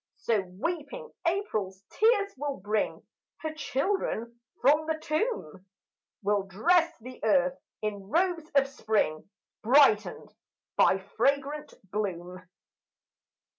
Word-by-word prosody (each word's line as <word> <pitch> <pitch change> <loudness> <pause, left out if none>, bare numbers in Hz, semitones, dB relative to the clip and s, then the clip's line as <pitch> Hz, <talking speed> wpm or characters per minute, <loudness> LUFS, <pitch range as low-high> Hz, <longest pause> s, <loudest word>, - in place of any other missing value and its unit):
So 230 - +1 0.2
weeping 355 - -4 0.2
April's 215 - -1
tears 425 -3 +3
will 285 +1 -3
bring 205 +2 -2 0.4
Her 315 -1 -3
children 275 - -2 0.2
from 300 +4 +4
the 320 -1 0
tomb, 310 - -2 0.6
Will 205 0 +2
dress 330 - +2
the 255 0 -11
earth 185 -5 +3 0.2
in 200 -2 -4
robes 335 - +1
of 275 -1 +5
spring, 215 - -1 0.3
Brightened 245 -3 +4 0.4
by 190 - +5 0.2
fragrant 280 +4 0 0.2
bloom. 185 -3 -3
270 Hz, 100 wpm, -28 LUFS, 205-320 Hz, 0.6 s, of